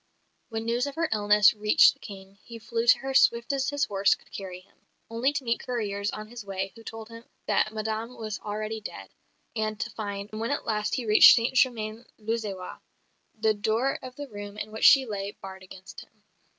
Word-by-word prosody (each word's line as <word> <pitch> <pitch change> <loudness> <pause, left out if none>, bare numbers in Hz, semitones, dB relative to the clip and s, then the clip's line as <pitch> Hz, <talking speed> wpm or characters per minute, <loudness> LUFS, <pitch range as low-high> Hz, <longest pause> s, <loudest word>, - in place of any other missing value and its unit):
When 225 -1 -4
news 240 +4 0
of 280 - -6
her 330 0 0
illness 210 -1 +5
reached 210 0 +5
the - - -29
King, 195 0 -12
he 235 -2 -10
flew 230 +1 -3
to - - +7
her 270 0 -5
swift 235 -1 +3
as 270 -1 0
his 285 0 0
horse 195 -1 +2
could - - -25
carry 185 -2 -7
him, 185 - -27 0.4
only 235 +5 +1
to 285 - -3
meet 230 -1 0
couriers 205 -5 -2
on 215 0 -6
his 235 0 -9
way 195 -1 -4
who 230 - -13
told 225 0 -8
him 230 0 -11 0.2
that 215 - +1
Madame 220 +2 -4
was 215 -2 -5
already 215 +1 -4
dead; - - -8 0.5
and 215 -1 -2
to - - -3
find, 205 -1 -6
when 220 +2 -3
at 285 - -2
last 210 -1 -1
he 250 - -3
reached 215 0 +9
St 235 +2 0
Germain 230 -3 +1
l'Auxerrois, 210 -4 -4 0.6
the 220 0 +3
door 220 +6 0
of 255 -1 -9
the 290 +1 -7
room 205 -2 -9
in 215 0 -6
which 220 - -1
she 270 -2 +8
lay 200 -2 -4
barred 190 0 -9
against 185 0 -12
him. - - -20
220 Hz, 205 wpm, -27 LUFS, 205-235 Hz, 0.6 s, reached